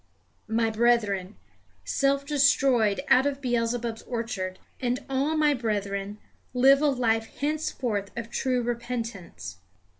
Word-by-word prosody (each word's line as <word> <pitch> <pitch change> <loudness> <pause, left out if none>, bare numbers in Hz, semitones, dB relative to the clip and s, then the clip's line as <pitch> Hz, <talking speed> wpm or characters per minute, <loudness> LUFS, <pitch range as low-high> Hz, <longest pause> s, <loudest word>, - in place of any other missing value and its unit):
My 225 0 +1
brethren, 215 -4 +1 0.5
self 275 0 +1
destroyed 275 -6 +3
out 260 +2 +5
of 280 -1 -2
Beelzebub's 235 -2 -1
orchard, 225 -6 -4 0.2
and 250 +2 -2
all 275 +4 0
my 300 -1 +4
brethren, 205 -4 -2 0.4
live 270 +3 +6
a 300 - +4
life 225 -5 +1
henceforth 265 -9 -2
of 230 -1 -5
true 255 -2 0
repentance. 230 - -5
240 Hz, 115 wpm, -27 LUFS, 220-270 Hz, 0.5 s, live